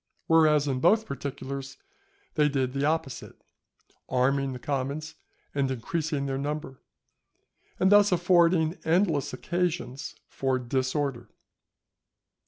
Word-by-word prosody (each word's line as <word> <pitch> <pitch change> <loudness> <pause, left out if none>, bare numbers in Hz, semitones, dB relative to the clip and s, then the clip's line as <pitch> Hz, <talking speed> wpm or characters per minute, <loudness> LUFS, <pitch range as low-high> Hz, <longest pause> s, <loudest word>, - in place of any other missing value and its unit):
Whereas, 155 -3 +4
in 130 -2 0
both 215 +9 +4
particulars, 140 -2 -6 0.6
they 150 -2 +3
did 130 -2 -1
the 140 +1 0
opposite, 155 -4 -2 0.7
arming 135 +2 +1
the 130 - -5
commons 140 +4 -3 0.4
and 140 -2 0
increasing 145 +3 -2
their 135 -1 -2
number, 145 -2 -4 1.0
and 190 +1 +3
thus 205 0 +6
affording 175 -1 +3
endless 165 -4 +1
occasions 155 -3 -3
for 135 -1 -1
disorder. 130 0 -2
140 Hz, 105 wpm, -27 LUFS, 135-160 Hz, 1.0 s, thus